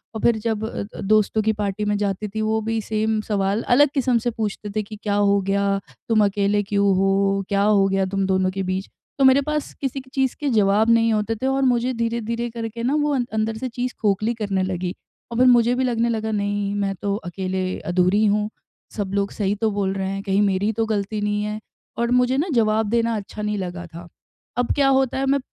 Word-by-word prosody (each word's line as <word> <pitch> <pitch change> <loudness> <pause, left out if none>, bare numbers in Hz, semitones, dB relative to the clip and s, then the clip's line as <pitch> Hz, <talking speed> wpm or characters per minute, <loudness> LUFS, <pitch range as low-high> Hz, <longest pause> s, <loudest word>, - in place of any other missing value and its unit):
और 220 - -4
फिर 235 -2 +3
जब 220 -1 -1
अ - - -4
अ, - - -6
दोस्तों 215 +1 +2
की 220 +1 +2
पार्टी 200 +1 -2
में 210 0 +1
जाती 200 0 -2
थी, 220 +2 -4
वो 220 0 0
भी 225 0 0
सेम 220 0 +1
सवाल 200 +2 +1
अलग 290 0 +6
किस्म 260 -4 +2
से - - +2
पूछते 215 -2 -4
थे 215 - 0
कि, 215 +1 -9
"क्या 205 -1 0
हो 200 0 +3
गया? 200 0 +1 0.3
तुम 220 -2 +4
अकेले 200 +1 +1
क्यों 200 -1 +2
हो? 195 +1 +2
क्या 200 0 +2
हो 205 -2 +4
गया 195 0 +1
तुम 195 0 +1
दोनों 190 -1 +1
के - - 0
बीच?" 190 +1 -2 0.3
तो - - +4
मेरे 265 +1 +6
पास 300 -1 -2
किसी 270 -1 -2
की 260 - -20
चीज़ 265 -2 0
के 290 - -1
जवाब 215 -1 +3
नहीं 230 0 +4
होते 215 +1 0
थे 255 +5 -2
और 270 0 +1
मुझे 250 0 +2
धीरे-धीरे 230 0 -2
करके 230 0 -5
ना, 265 +5 +1
वो 295 -1 +1
अं 250 -2 0
अंदर 220 0 -1
से 255 - -3
चीज़ 245 +1 -3
खोखली 215 +2 +1
करने 200 -4 -1
लगी, 185 -1 -2 0.4
और 230 - -3
फिर 255 +1 +5
मुझे 240 -1 +5
भी 260 - 0
लगने 235 -2 +1
लगा, 220 -1 -2
"नहीं, 205 -1 -1
मैं 200 -1 -1
तो 200 -1 0
अकेले 185 -1 -3
अधूरी 185 +4 +3
हूँ। 210 0 +1 0.5
सब 200 -3 -3
लोग 200 0 0
सही 200 -2 -1
तो 220 - +3
बोल 200 -2 -1
रहे 190 -1 -2
हैं, 195 0 -3
कहीं 200 0 +1
मेरी 200 -1 +1
ही 215 - +2
तो 225 - +3
गलती 210 -1 -2
नहीं 205 0 0
है?" 210 0 -3 0.4
और 235 +1 0
मुझे 250 +1 +3
ना, 305 +6 0
जवाब 220 -2 +2
देना 230 0 +1
अच्छा 210 +1 -7
नहीं 210 0 -1
लगा 175 -2 -5
था। 170 +1 -11 0.5
अब 245 -1 +1
क्या 280 -1 +3
होता 265 -1 0
है, 270 - 0
मैं 275 +1 +2
215 Hz, 235 wpm, -22 LUFS, 200-235 Hz, 0.5 s, अलग